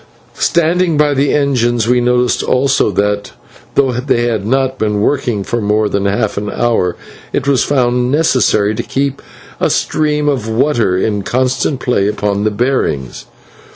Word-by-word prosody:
Standing 170 0 +1
by 150 -1 +3
the 140 +1 +1
engines 120 -5 +1
we 125 0 +3
noticed 125 0 +1
also 135 -2 +1
that, 100 +1 -1 0.4
though 135 -2 +3
they 125 -1 0
had 110 -4 -1
not 130 +1 0
been 105 -1 0
working 120 -3 0
for 120 +4 -2
more 105 +1 +1
than 100 -1 -1
half 100 +1 -1
an 105 0 -3
hour, 110 -8 0 0.4
it - - -2
was 140 -3 +3
found 125 -2 +1
necessary 130 -8 +2
to - - -3
keep 140 0 -2 0.4
a - - +1
stream 150 -1 0
of 125 -6 -1
water 115 -6 +1
in 105 +1 -1
constant 130 +4 -1
play 100 -6 +1
upon 105 -1 -1
the - - +3
bearings. 105 - -2
120 Hz, 155 wpm, -14 LUFS, 105-135 Hz, 0.4 s, by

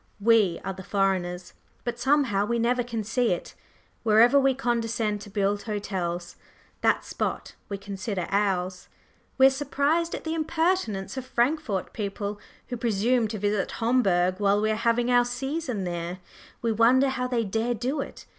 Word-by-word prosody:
We 210 -5 +4
are 195 - -2
the 190 - -9
foreigners; 185 -2 -1 0.3
but 240 0 -4
somehow 265 -7 +2
we 235 +3 0
never 245 +2 +1
can 230 -2 -4
see 230 0 +1
it. 175 - -6 0.5
Wherever 230 +5 +5
we 270 -1 +3
condescend 230 -4 -1
to 205 - -10
build 205 +1 0
hotels, 185 -5 -4 0.4
that - - +2
spot - - -3 0.2
we 200 - -3
consider 195 -1 -4
ours. 185 -2 0 0.5
We 265 - +7
are 270 - +7
surprised 290 +4 0
at - - -7
the 320 - -2
impertinence 320 - -1
of 260 - -4
Frankfort 240 - 0
people 205 0 -4 0.3
who 245 - -3
presume 230 +1 +1
to 215 0 -5
visit 205 0 -1
Homburg 190 -6 +2
while 200 0 +3
we 215 +1 +1
are - - +1
having 235 +2 +1
our 245 0 +5
"season" 255 -2 -3
there; 175 0 -4 0.5
we 230 - +2
wonder 245 +5 +4
how 250 -1 -2
they 245 -2 0
dare 225 +4 -1
do 260 +6 -2
it! - - -9
225 Hz, 165 wpm, -26 LUFS, 195-250 Hz, 0.5 s, We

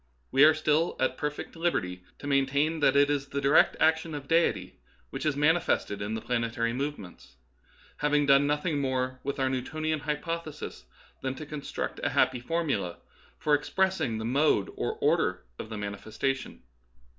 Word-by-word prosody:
We 135 +2 +5
are 155 0 +6
still 155 +2 +1
at 130 0 +1
perfect 150 +4 -4
liberty 95 - -1
to - - -11
main 140 -1 +2
tain 150 +4 +1
that 140 -2 +3
it 140 0 +6
is 140 -1 -1
the 140 - -3
direct 140 +2 +4
action 160 0 +2
of 140 -2 -7
Deity 165 +2 +1 0.3
which - - -3
is 150 - +1
manifested 150 -9 +1
in 105 +2 -2
the 110 - -4
planetary 115 -1 -1
movements; 115 - -6 0.6
having 150 0 +2
done 140 +1 +5
nothing 150 +1 0
more 130 -1 -1
with 140 - -3
our 135 - +2
Newtonian 155 +4 -2
hypoth 160 +3 -3
esis 155 -1 -8 0.4
than 130 0 -2
to 155 - -7
construct 145 -1 -5
a - - +2
happy 130 - +3
formula 125 - -2 0.4
for 155 -2 0
ex 145 0 +1
pressing 190 -11 +1
the 110 - -4
mode 130 -4 +2
or - - -2
order - - +1 0.2
of 110 - -6
the 110 - -5
manifestation. 110 +6 -4
140 Hz, 170 wpm, -28 LUFS, 125-155 Hz, 0.6 s, are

